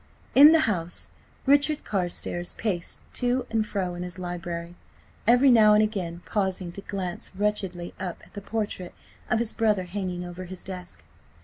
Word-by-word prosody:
In 290 Hz, +3 st, +10 dB
the 325 Hz, -1 st, +5 dB
house, 175 Hz, -, -2 dB, 0.3 s
Richard 285 Hz, +2 st, +3 dB
Carstares 175 Hz, -2 st, -1 dB
paced 185 Hz, -7 st, -3 dB
to 250 Hz, +1 st, +1 dB
and 220 Hz, -1 st, +1 dB
fro 185 Hz, -4 st, -2 dB
in 175 Hz, -, -6 dB
his 180 Hz, 0 st, -3 dB
library, 175 Hz, -1 st, -5 dB, 0.5 s
every 245 Hz, +3 st, +6 dB
now 215 Hz, -3 st, +7 dB
and 215 Hz, -, +5 dB
again 180 Hz, -5 st, -3 dB
pausing 190 Hz, -4 st, -1 dB
to 200 Hz, -, -8 dB
glance 185 Hz, -3 st, -4 dB
wretchedly 190 Hz, -4 st, -1 dB
up 185 Hz, -2 st, -5 dB
at -, -, -21 dB
the 205 Hz, -, -6 dB
portrait 205 Hz, -4 st, -4 dB, 0.3 s
of 240 Hz, -, +3 dB
his 230 Hz, -1 st, 0 dB
brother 210 Hz, -4 st, +2 dB
hanging 180 Hz, -1 st, -4 dB
over 175 Hz, +1 st, -7 dB
his 185 Hz, 0 st, -6 dB
desk. 180 Hz, -2 st, -8 dB
190 Hz, 165 wpm, -26 LUFS, 175-220 Hz, 0.5 s, In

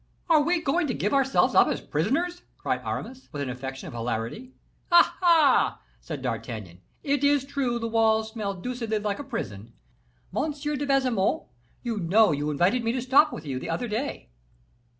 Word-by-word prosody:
"Are 310 Hz, -2 st, +6 dB
we 345 Hz, +4 st, +1 dB
going 310 Hz, +3 st, +1 dB
to 245 Hz, -, -2 dB
give 205 Hz, -, -1 dB
ourselves 270 Hz, -1 st, +3 dB
up -, -, +6 dB
as -, -, -1 dB
prisoners?" 315 Hz, -, -1 dB, 0.2 s
cried -, -, -2 dB
Aramis, 260 Hz, +1 st, -6 dB
with 145 Hz, -1 st, -3 dB
an 130 Hz, -, -3 dB
affection 135 Hz, +1 st, -7 dB
of -, -, -8 dB
hilarity. 120 Hz, -, -4 dB, 0.4 s
"Ah! 345 Hz, -, +6 dB
ah!" 330 Hz, -6 st, +4 dB, 0.2 s
said 150 Hz, -5 st, -7 dB
D'Artagnan; 110 Hz, -7 st, -5 dB, 0.2 s
"it 285 Hz, -1 st, 0 dB
is 285 Hz, -1 st, +3 dB
true 275 Hz, -4 st, -1 dB
the 230 Hz, -1 st, -3 dB
walls 220 Hz, -1 st, +2 dB
smell 210 Hz, -3 st, -3 dB
deucedly 230 Hz, +2 st, -3 dB
like 205 Hz, +1 st, -2 dB
a -, -, -4 dB
prison. 115 Hz, -, -6 dB, 0.6 s
Monsieur 295 Hz, 0 st, -2 dB
de 285 Hz, +1 st, -3 dB
Baisemeaux, 255 Hz, -8 st, +1 dB, 0.3 s
you 230 Hz, -4 st, -2 dB
know 195 Hz, +3 st, +4 dB
you 145 Hz, 0 st, -1 dB
invited 180 Hz, -, +2 dB
me 230 Hz, -, +1 dB
to 255 Hz, -, -1 dB
sup 275 Hz, +4 st, +5 dB
with 155 Hz, -, -7 dB
you 135 Hz, -3 st, -3 dB
the -, -, -6 dB
other 165 Hz, +9 st, -2 dB
day." 220 Hz, -, -4 dB
230 Hz, 180 wpm, -26 LUFS, -, 0.6 s, Are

